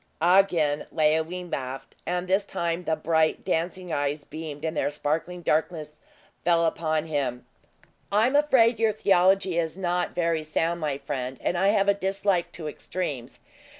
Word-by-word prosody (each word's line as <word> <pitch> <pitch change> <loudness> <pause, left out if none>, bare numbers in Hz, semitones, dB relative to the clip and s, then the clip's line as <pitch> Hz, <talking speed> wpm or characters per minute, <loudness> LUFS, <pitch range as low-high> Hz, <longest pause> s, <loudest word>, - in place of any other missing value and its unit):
Again 170 -4 +3
Leoline 160 +3 0
laughed; 130 0 -5
and 180 +1 -1
this 190 +2 +2
time 170 -2 -3
the 160 - +1
bright, 160 -1 +1
dancing 175 +1 -2
eyes 145 +1 -1
beamed 155 0 -7
in 160 - -1
their 150 - 0
sparkling 160 +4 -3
darkness 155 -1 -1 0.4
full 170 -1 +3
upon 160 -1 0
him. 135 -6 -2 0.7
"I 210 +2 +4
am 260 +3 +1
afraid 250 -6 +4
your 225 -1 +3
theology 190 -2 +3
is 165 +1 -2
not 180 -1 -1
very 165 -2 +1
sound, 165 +2 -1
my 145 -3 -1
friend, 135 -2 -4
and - - -1
I 190 +3 +2
have 200 -1 +3
a 200 - +5
dislike 195 -2 0
to 160 -3 -6
extremes. 145 -6 -5
170 Hz, 155 wpm, -26 LUFS, 150-185 Hz, 0.7 s, a